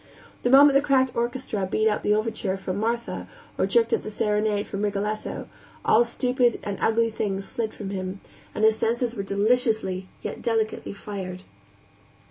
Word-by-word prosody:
The 245 - +1
moment 280 +2 +8
the 275 - +5
cracked 265 -3 +2
orchestra 235 -5 -2
beat 215 +3 +2
out 210 - +1
the 210 - +2
overture 215 -3 -1
from 190 0 -4
Martha, 235 +2 -2 0.3
or - - +1
jerked 465 -1 +3
at 455 - +2
the - - -6
serenade 210 0 0
from 200 - -5
Rigoletto, 210 +1 -2 0.4
all 230 - +6
stupid 245 0 +1
and 200 -1 -4
ugly 230 0 +2
things 195 -2 -2
slid 225 -2 -3
from 200 -2 -6
him, 190 0 -4 0.4
and 215 - -1
his 220 0 +4
senses 235 +1 0
were 210 - -3
deliciously, 200 -2 +1 0.2
yet - - -5
delicately 225 -3 -1
fired. 190 -2 -6
215 Hz, 165 wpm, -25 LUFS, 200-240 Hz, 0.4 s, moment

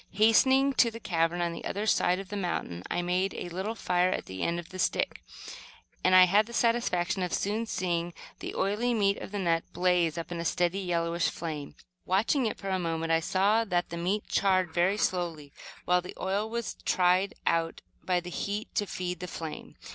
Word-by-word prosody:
Hastening 260 +6 +4
to 235 - +3
the 230 0 -9
cavern 170 -3 0
on 170 -1 -1
the - - -8
other 205 +2 -3
side 180 -4 +3
of 195 -1 -7
the 205 - -5
mountain, 175 - -3
I 175 - -1
made 180 +2 0
a 175 - -5
little 190 +6 -3
fire 180 -3 +1
at - - -2
the 95 0 -7
end 170 0 0
of 175 - -9
the 185 - -9
stick, - - 0 0.8
and 185 0 +5
had 190 +4 +6
the 235 - -10
satisfaction 230 -7 +1
of 180 - -1
soon 215 +3 -1
seeing 175 -3 -2 0.2
the - - -6
oily 220 +5 0
meat 200 -2 +2
of - - -8
the 205 - -3
nut 170 -4 +1
blaze 175 -3 +2
up 170 +1 -5
in 170 - -3
a - - -2
steady, 175 +2 0
yellowish 170 -2 0
flame. 155 -4 -6 0.3
Watching 225 +7 +2
it - - -4
for 195 - -6
a 190 -1 0
moment, 165 -1 -2
I 165 - +4
saw 200 +6 +2
that 175 -5 -1
the 170 - -5
meat 190 +5 -1
charred 185 -4 +2
very 180 +4 +2
slowly, 170 -8 -2 0.3
while 180 0 +3
the 180 - -10
oil 200 +3 -1
was 235 0 -4
tried 185 +1 +2
out 165 0 0 0.2
by 180 -1 +1
the 180 0 -8
heat 205 +4 -4
to 205 - 0
feed 180 -2 -4
the 180 - -5
flame. 160 -2 -7
180 Hz, 205 wpm, -29 LUFS, 170-205 Hz, 0.8 s, had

